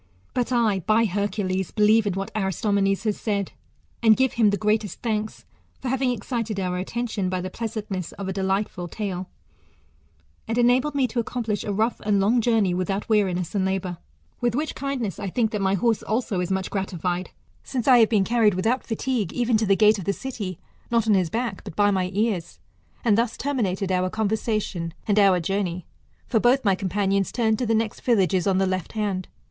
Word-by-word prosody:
But 245 0 -1
I, 225 -5 +2
by 215 +5 +3
Hercules, 190 -2 -1
believe 215 0 +3
in 200 - 0
whac 195 +1 -4
Aristomenes 195 0 0
has 215 -2 -1
said, 200 -3 -1 0.5
and 220 -2 +6
give 265 0 +2
him 225 -3 +4
the 205 - +1
greatest 210 0 -1
thanks, 215 -2 -2 0.3
for 255 - -4
having 260 0 +1
excited 230 -2 -2
our 180 -1 -1
attention 210 -1 -2
by 185 0 -1
the 185 +1 -5
pleasantness 210 -5 -4
of 200 - -6
a 190 - -2
de 195 - -3
lightful 190 -2 -1
tale; 190 -3 -4 1.2
and 225 +1 -2
enabled 250 +4 +3
me 275 -2 +3
to 240 0 -2
accomplish 230 -2 -2
a 205 - -3
rough 220 +4 0
and' 205 -1 +2
long 225 +5 +3
journey 220 -5 +2
without 195 +3 -2
weariness 185 -5 +1
and 200 -2 +1
labour. 185 -2 -2 0.4
With 240 -2 0
which 305 +2 -1
kindness 265 -8 -3
I 195 - -3
think 225 +3 0
that 210 - -2
my 195 0 +2
horse 225 +3 +1
also 220 -3 -1
is 180 - -2
much 190 -1 -1
gratified, 180 -2 -2 0.3
since 255 -2 -3
I 250 -2 +7
have 225 - +5
been 210 -4 +3
carried 220 -2 +3
without 225 +8 0
fatigue 230 -4 -2
even 240 -1 +1
to 215 -1 0
the 195 - +5
gate 215 0 +4
of 185 - -6
the 200 - +1
city, 205 -8 -5 0.3
not 230 -2 +1
on 215 - +5
his 185 -4 +2
back, 230 0 -3
but - - -9
by 205 0 +4
my 185 -2 0
ears. 200 -4 -1 0.5
And 220 -1 +4
thus 235 -1 0
terminated 200 -9 -1
our 185 0 +1
conversation 215 -5 -2
and 210 0 +3
our 195 -3 +5
journey; 180 -1 -2 0.4
for 225 - +2
both 245 +4 +5
of - - -22
my 195 - +4
companions 195 0 0
turned 220 -3 +1
to 250 - -1
the 225 - +2
next 220 -1 -2
village^ 195 -6 +2
on 190 - +2
the 195 - +3
left 185 -1 -2
hand. 200 -4 -2
210 Hz, 200 wpm, -24 LUFS, 190-230 Hz, 1.2 s, I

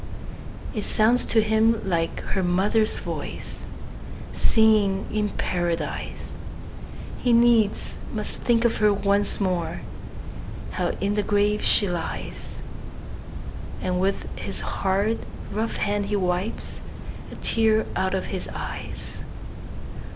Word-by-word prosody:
It 215 - -2
sounds 230 +3 +4
to 220 -1 +4
him 220 +1 +3
like 165 -3 0
her 190 - +1
mother's 195 +5 +2
voice, - - -5 0.7
Singing 215 -3 +3
in 210 -1 0
Paradise! 170 -3 -2 0.9
He 245 - +1
needs 230 -3 +4 0.2
must - - -2
think 235 -1 +2
of 235 - +2
her 210 -1 +4
once 200 0 +2
more 180 -4 -1 0.9
How - - -1
in 200 +1 +1
the 210 - +2
grave 205 +1 +1
she 205 - +6
lies; 175 -2 -5 1.2
And 180 0 -1
with 195 +1 0
his 195 - -3
hard, 200 +4 0 0.3
rough 220 +2 -1
hand 205 0 0
he 210 - 0
wipes 185 +2 -2 0.5
A - - -8
tear 220 -1 +2
out 190 0 +1
of 190 - -1
his 185 - -3
eyes. - - -6
205 Hz, 115 wpm, -25 LUFS, 190-220 Hz, 1.2 s, she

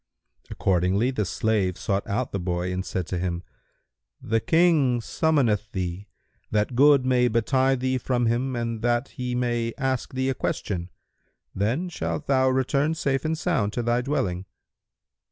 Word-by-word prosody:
Accordingly 95 +6 +1
the 110 -6 -1
slave 100 -2 0
sought 100 0 -2
out 105 +5 -2
the 100 - -2
boy 90 0 -2
and 95 +1 -2
said 95 -2 -3
to 90 +1 -3
him, 90 -1 -2 0.8
"The 115 +1 0
King 155 -4 +3
summoneth 115 -6 +1
thee, 95 +1 -4 0.4
that 105 +3 0
good 140 0 +5
may 125 -1 +3
betide 130 +3 +1
thee 130 0 0
from 120 -1 0
him 125 +3 0
and 115 -2 -3
that 120 +2 +1
he 125 -1 -4
may 120 -2 -1
ask 130 -1 -2
thee 130 +1 0
a - - 0
question; 90 -7 -3 0.6
then 115 - 0
shalt 160 -3 -4
thou 130 -2 +3
return 140 +4 +1
safe 135 -4 -1
and 160 0 0
sound 150 - 0
to 120 - -2
thy 120 +1 +1
dwelling." 95 -9 -2
120 Hz, 155 wpm, -25 LUFS, 100-130 Hz, 0.8 s, good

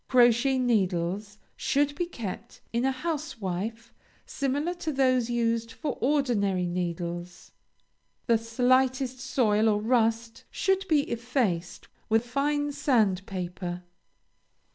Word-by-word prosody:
Crochet 245 +1 +4
needles 205 -4 0 0.2
should 285 +1 +1
be 345 +4 -2
kept 235 - -7
in 235 +2 +1
a 270 - +3
housewife 230 - -4 0.3
similar 285 +5 -1
to 345 -3 -4
those 255 -3 +2
used 230 -1 0
for 295 0 -4
ordinary 230 -9 +1
needles. 175 0 -4 0.7
The 230 -2 +3
slightest 255 +2 +1
soil 225 -5 +2
or 210 -1 +2
rust 230 0 0
should 385 0 0
be 310 -4 +4
effaced 235 - -2 0.2
with 225 +2 +3
fine 290 +3 0
sandpaper. 190 -9 -1
235 Hz, 105 wpm, -27 LUFS, 205-270 Hz, 0.7 s, Crochet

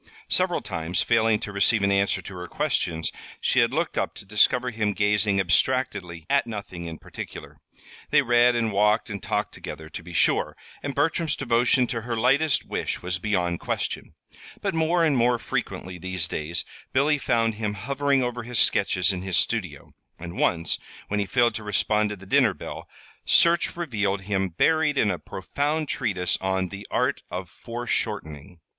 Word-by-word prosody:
Several - - +2
times, 80 +2 -2
failing 115 -2 +3
to 100 - -5
receive 100 +2 +3
an 100 - +3
answer 100 0 +2
to 100 - -8
her 90 -1 -7
questions, 80 -1 -1 0.3
she - - +2
had - - +4
looked - - -1
up - - -2
to - - -11
discover 120 +5 +3
him 110 -2 0
gazing 105 -1 +2
abstractedly 95 -4 0
at - - +2
nothing 100 -6 -6
in 80 -1 -6
particular. - - -9 0.5
They 150 -1 +4
read 120 0 +4
and 115 -2 +1
walked 105 +3 +2
and 100 - -5
talked - - -2
together, 80 0 -8
to 80 - -7
be 85 +1 -11
sure, - - +2 0.2
and 140 -2 -4
Bertram's 160 +1 +1
devotion 125 0 +2
to 115 -1 -3
her 115 0 -3
lightest 135 +6 +3
wish - - -3
was 90 +1 -2
beyond 90 -4 0
question; - - -3 0.4
but - - -2
more 165 +1 +2
and 150 -3 +2
more 120 0 +3
frequently 90 -5 -4
these 95 -1 -2
days 80 +2 -3 0.3
Billy 145 +2 +3
found 115 -3 +1
him 105 -1 -3
hovering 135 +5 +1
over 120 0 -2
his 120 +1 -4
sketches 90 -1 +3
in 90 - -4
his 95 -2 -1
studio; 90 -9 -1 0.2
and 85 +1 -8
once, 85 -1 +1 0.3
when 105 - 0
he 100 - -1
failed 120 0 +3
to 110 - -5
respond 105 0 +1
to 105 - -4
the 95 0 -14
dinner 120 -3 +3
bell, - - -8 0.3
search 170 0 +4
revealed 105 - -1
him 95 -1 -1
buried 155 - +2
in 105 -5 +3
a 90 - -3
profound 145 - -2
treatise 100 -10 0
on 95 -1 0
"The 100 +2 -8
Art - - 0
of 90 +1 -5
Foreshortening." 100 - -4
105 Hz, 175 wpm, -25 LUFS, 95-125 Hz, 0.5 s, had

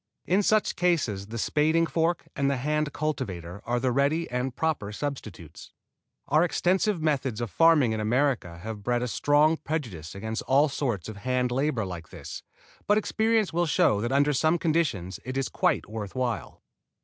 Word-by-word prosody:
In 190 +3 +3
such 215 +1 +2
cases 135 - 0
the 115 +2 -6
spading 155 +7 +2
fork 165 +1 0
and 140 -1 +1
the 140 - 0
hand 150 +3 -1
cultivator 100 - -4
are 120 +1 0
the 130 +1 +1
ready 140 +6 +1
and 125 0 -2
proper 150 -11 -1
substitutes. 105 - -7 0.5
Our 155 +4 +4
extensive 180 +1 +1
methods 135 -7 0
of 120 -4 -3
farming 155 - +5
in 110 - -2
America 115 -6 0
have 110 -1 -6
bred 120 +3 0
a - - -1
strong 150 +6 +3
prejudice 115 - -5
against 110 +3 -4
all 140 +3 +4
sorts 120 - -2
of 110 -2 -7
hand 125 +3 0
labor 130 -4 0
like 85 -3 -7
this, - - -8 0.5
but 210 - +4
experience 220 -2 +1
will 175 0 +1
show 105 -7 +3
that 120 +2 -2
under 145 +2 +3
some 155 +5 +2
conditions 140 - -1
it 130 +1 -4
is 135 - -1
quite - - 0
worth 105 -2 -6
while. 120 -7 -3
135 Hz, 175 wpm, -27 LUFS, 110-155 Hz, 0.5 s, farming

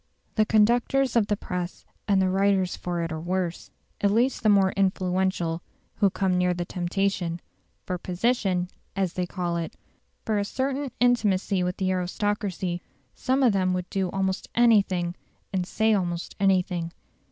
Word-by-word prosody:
The 215 -1 +2
conductors 240 +4 +3
of 225 -3 +3
the 205 - 0
press 180 -1 -5 0.2
and 200 -2 +4
the 190 -1 +3
writers 195 -1 +2
for 175 -1 -3
it 165 - -3
are 160 - -3
worse 175 0 -2 0.3
at 200 - +4
least 235 +6 +2
the 215 - +3
more 195 -2 +5
influential 185 -3 0 0.4
who 200 -2 +4
come 185 -1 0
near 180 0 +2
the 175 0 -3
temptation; 175 -1 -1 0.5
for 180 -1 -3
"position," 185 -1 0 0.3
as 190 -3 0
they 180 -1 -2
call 175 -2 -2
it, 165 -1 -4 0.5
for 215 -2 +1
a - - +1
certain 270 +5 -2
intimacy 205 -6 +2
with 180 0 -1
the 185 -1 0
aristocracy, 185 -1 -1 0.3
some 265 +2 0
of 240 -5 +5
them 185 -1 +1
would 180 0 -3
do 190 -2 0
almost 190 0 -2
anything 200 -7 +3 0.4
and 185 -2 -1
say 220 +2 +2
almost 175 -4 -2
anything. 180 -3 +1
190 Hz, 160 wpm, -26 LUFS, 180-205 Hz, 0.5 s, more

